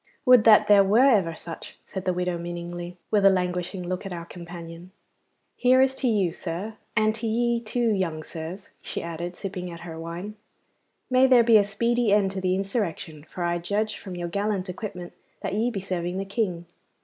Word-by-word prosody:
'Would 250 -4 +7
that 220 -2 +7
there 205 -1 +7
were 235 +8 +5
ever 180 -8 +2
such,' 165 0 -9
said 190 -2 -6
the 185 - +2
widow 180 0 -1
meaningly, 175 +1 -6
with 210 -2 +3
a 195 - +8
languishing 180 0 -1
look 185 +1 -3
at 195 - -6
our 170 -1 -5
companion. 170 0 -9 0.7
'Here 255 +1 +4
is 265 0 +4
to 265 - 0
you, 200 -7 +2
sir 180 +5 -5 0.2
and 215 0 +3
to 225 +1 -4
ye, 235 +1 +1
too, 235 0 0
young 170 -6 -1
sirs,' 170 +6 -8
she - - -5
added, 170 +1 -5
sipping 185 -2 -5
at 170 -1 -9
her 165 -2 -8
wine. 175 +6 -6 0.7
'May 255 +1 +6
there 250 -2 +6
be 230 -1 +7
a 205 - +5
speedy 235 +3 +1
end 200 -2 +3
to 190 -1 -4
the 185 0 +1
insurrection, 190 -6 -3
for 180 - -5
I 175 0 0
judge, 205 +5 -1
from 185 -2 -8
your 175 0 -3
gallant 200 0 -2
equipment, 180 -2 -6 0.3
that - - -3
ye 220 +4 +1
be 220 -5 -4
serving 180 -1 -3
the 195 - -2
King. 195 -5 -2
190 Hz, 195 wpm, -25 LUFS, 175-215 Hz, 0.7 s, a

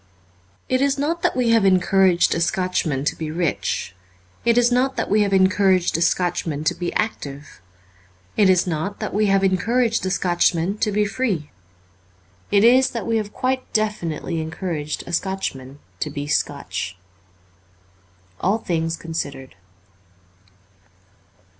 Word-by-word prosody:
It 255 0 +1
is 280 0 +2
not 315 +5 -1
that - - +1
we 240 -2 +2
have 225 -2 +4
encouraged 185 -1 +4
a - - -1
Scotchman 170 -7 0
to - - 0
be 160 -1 -5
rich; 160 - -2 0.5
it 235 0 +3
is 245 0 +4
not 255 +2 +2
that 225 - -3
we 210 +1 +4
have 200 -1 +1
encouraged 190 -1 +3
a 165 - 0
Scotchman 170 -4 0
to - - +1
be 175 -1 -4
active; 145 - -4 0.7
it 205 -3 +4
is 185 -2 +4
not 180 +4 -3
that - - -4
we 210 +1 +2
have 195 0 +3
encouraged 225 +5 +1
a 190 - -1
Scotchman 180 +1 +1
to 210 - +1
be 210 +1 +1
free. 200 - -2 1.0
It 205 0 +4
is 255 +3 +6
that 230 -6 -5
we 230 -1 +1
have 210 -2 -3
quite 255 +2 -2
definitely 175 -7 -1
encouraged 155 -2 -4
a 175 - -8
Scotchman 145 -8 -3 0.2
to 155 - -2
be 145 0 -5
Scotch. 120 -9 -2 1.4
'Jll 195 +4 +2
Things 165 -1 -1
Considered.' 140 -5 -6
190 Hz, 145 wpm, -22 LUFS, 165-220 Hz, 1.4 s, is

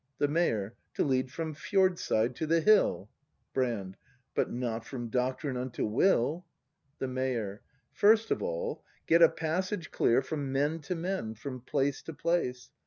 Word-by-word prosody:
The 145 - +2
Mayor. 120 - 0 0.2
To - - +2
lead 130 -2 +1
from 160 0 -4
fjordside 175 - +1
to 160 - -2
the 165 +1 +4
hill. 165 - +3 0.4
Brand. 110 -7 -1 0.4
But - - +1
not 120 -2 -2
from 120 -1 -6
Doctrine 130 +3 -1
unto 125 0 -2
Will. 145 - +2 0.5
The 135 - -2
Mayor. 125 -6 -2 0.3
First 220 +2 +4
of - - +1
all, - - -3 0.2
get 170 +1 +4
a 165 - +9
passage 180 +2 -2
clear 120 +3 +3
From 140 -1 -3
men 145 +4 +1
to 160 +4 -4
men, 170 - -3
from 130 +3 -7
place 140 +2 0
to 165 - -8
place. 125 -8 -1
140 Hz, 155 wpm, -30 LUFS, 125-170 Hz, 0.5 s, a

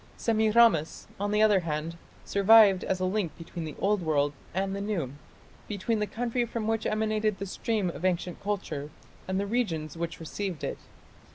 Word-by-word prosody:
Semiramis, 220 -7 +3
on 205 +1 -1
the 210 +1 +3
other 210 -3 +5
hand, 165 -1 -3 0.3
survived 200 -1 +6
as 185 - -1
a 185 - 0
link 185 -3 -1
between 165 0 -7
the 155 - -7
old 205 0 +1
world 145 -3 +1 0.2
and 195 +1 -1
the 200 - -3
new, 185 -11 -2 0.5
between 215 +2 -1
the 210 - 0
country 240 +2 -1
from 230 -1 -3
which 225 0 0
emanated 215 -1 0
the 200 - -4
stream 200 -1 -1
of 170 - -10
ancient 180 -1 -1
culture 195 -8 -3 0.4
and 190 +1 0
the 200 - -1
regions 175 - -1
which 170 0 -4
received 175 0 -5
it. - - -3
195 Hz, 175 wpm, -28 LUFS, 170-215 Hz, 0.5 s, survived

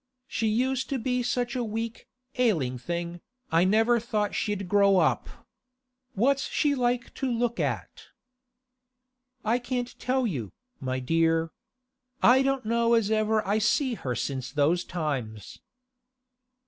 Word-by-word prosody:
'She 225 -4 -1
used 255 +4 0
to 275 - 0
be 250 +1 -1
such 245 0 -1
a 250 - 0
weak, 225 +1 -4 0.3
ailing 160 - +2
thing, 170 +5 -4 0.3
I 165 +2 +4
never 225 +4 +3
thought 215 -2 -1
she'd 205 -3 -2
grow 200 0 +4
up. - - +2 0.9
What's 270 +7 +2
she 295 -2 +1
like 245 -2 -1
to 265 -2 -2
look 235 0 -1
at?' - - -3 1.4
'I 230 +3 +2
can't 245 0 -4
tell 255 0 0
you, 130 - -3 0.3
my 130 -2 -2
dear. 165 +4 +1 0.7
I 255 +2 +7
don't 270 -2 0
know 235 +1 +3
as 220 -2 +1
ever 215 -1 +1
I 205 +2 +2
see 255 +4 +2
her 130 - -3
since 130 -1 -3
those 150 +5 +2
times. 135 - -4
220 Hz, 135 wpm, -27 LUFS, 170-245 Hz, 1.4 s, I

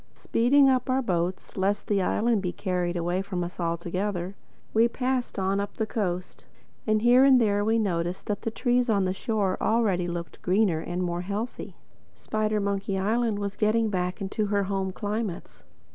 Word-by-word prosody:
Speeding 270 +4 +3
up 255 -1 +2
our 260 +1 +2
boat 180 -2 -2
lest 195 +2 0
the 200 -2 +1
island 220 +3 +1
be 180 -2 -2
carried 180 -2 -2
away 175 +2 0
from 185 -2 -3
us 175 +1 -7
altogether, 175 +2 -2 0.4
we 225 +1 +5
passed 255 +1 -2
on 195 +1 0
up 200 0 -4
the 220 - 0
coast; 185 -5 -4 0.4
and 215 0 +2
here 245 +2 +6
and 270 -2 +7
there 205 -3 +2
we 220 +2 +2
noticed 175 -4 -1
that 205 -1 -2
the - - -2
trees 245 +1 +1
on 200 -3 +2
the 185 - 0
shore 195 -2 -1
already 205 -6 +2
looked 170 -3 -6
greener 185 -3 +2
and 175 +3 -3
more 175 0 -2
healthy. 205 +6 -5 0.4
Spidermonkey 200 -2 -1
Island 220 +2 +1
was 200 -1 -3
getting 220 0 +2
back 180 0 -2
into 205 +1 -2
her 200 0 +1
home 190 -1 -2
climates. 205 -2 -4
200 Hz, 175 wpm, -26 LUFS, 180-225 Hz, 0.4 s, and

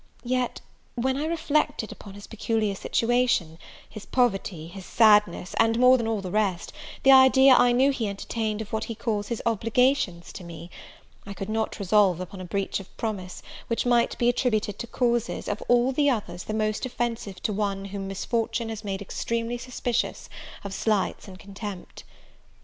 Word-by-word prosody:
Yet, 250 0 -1 0.3
when 260 +2 0
I 290 +3 -2
reflected 305 -6 0
upon 200 -2 -11
his 205 - -10
peculiar 220 -2 -1
situation, 230 -7 0 0.3
his 215 -1 -10
poverty, 195 -9 0
his 190 +2 -10
sadness, 210 -3 +3
and, 225 0 +3
more 250 +1 +7
than 235 -3 -1
all 220 -3 -1
the 185 -2 -6
rest, 200 -4 -1 0.3
the 270 - +7
idea 265 0 +7
I 245 -1 +5
knew 260 +3 +4
he 235 -5 -2
entertained 215 +2 -3
of 215 - -15
what 220 0 -1
he 230 - -6
calls 210 -2 -2
his 235 - -4
obligations 230 -4 +1
to - - -8
me, 170 0 -10 0.6
I 200 - -7
could 195 +2 -6
not 220 0 -2
resolve 200 -3 +3
upon 185 +1 -7
a - - -6
breach 195 +3 -2
of 195 - -14
promise, 195 -5 -5 0.2
which 230 - -1
might 240 -1 +2
be 240 - +1
attributed 220 -4 0
to 235 - -5
causes, 240 -1 -1
of 205 - -3
all 245 +2 +4
the 285 +2 +2
others 180 -8 -3
the 215 - -4
most 215 0 -1
offensive 235 -6 -3
to 210 - 0
one 200 -1 -2
whom 195 0 -5
misfortune 230 +4 -2
has 220 -1 -6
made 200 -1 -4
extremely 230 +3 -3
suspicious 245 -1 -3 0.3
of 200 -1 -6
slights 210 0 -1
and 190 -1 -10
contempt. 200 -1 -9
220 Hz, 175 wpm, -26 LUFS, 195-240 Hz, 0.6 s, more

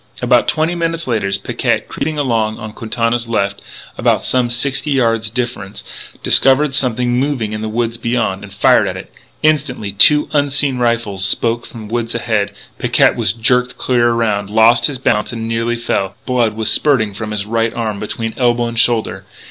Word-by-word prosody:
About - - +2
twenty 160 +2 +1
minutes 165 -1 -2
later 110 -5 -1
Picquet, 95 - -1
creeping 155 0 -4
along 115 -6 0
on 110 -2 -8
Quintana's 115 +1 -2
left, 100 -3 -1 0.4
and - - +2
some 125 -2 +1
sixty 135 +5 0
yards 115 -5 +1
distant, 120 -4 -4 0.4
discovered 135 +2 +4
something 125 -1 +1
moving 130 -6 -2
in 110 - -4
the 110 - -3
woods 115 +1 -2
beyond, 115 -6 -2
and 100 - -11
fired 100 - +3
at - - -4
it. - - -11 0.3
Instantly 145 -9 0
two 150 +10 +5
unseen 145 -2 +1
rifles 115 -5 -1
spoke 115 +4 0
from 110 -3 -10
the 110 - -10
woods 115 -1 -2
ahead. 110 -4 -1 0.3
Picquet - - +3
was - - 0
jerked 125 +3 0
clear 120 -2 +1
around, 110 -4 -1
lost 110 +2 +4
his 140 -3 -4
balance 115 -3 0
and 115 -1 -4
nearly 115 +1 -1
fell. 100 -5 -2
Blood 120 -4 0
was 110 0 +1
spurting 120 -9 +2
from 105 +2 -6
his 105 -1 -3
right 115 +1 0
arm, 110 -3 -3
between 115 +1 -4
elbow 120 -1 +1
and 115 -1 -2
shoulder. 115 -1 +1
115 Hz, 175 wpm, -16 LUFS, 110-125 Hz, 0.4 s, two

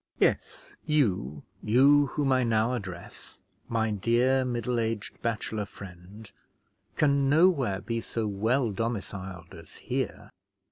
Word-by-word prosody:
Yes, - - -1
you, 95 - 0 0.2
you 140 +6 +5
whom 140 0 -1
I 130 -1 +3
now 115 +1 +1
address, 95 -7 -8 0.3
my 110 -1 0
dear, 120 +6 +2
middle 120 -1 -1
aged 110 -2 -3
bachelor 110 -2 -2
friend, 100 +3 -12 0.6
can 140 -2 +2
nowhere 145 - +3
be 115 -1 -3
so 115 0 -3
well 110 +4 +1
domiciled 95 -5 -5
as 85 -3 -12
here. - - -4
115 Hz, 120 wpm, -28 LUFS, 100-130 Hz, 0.6 s, you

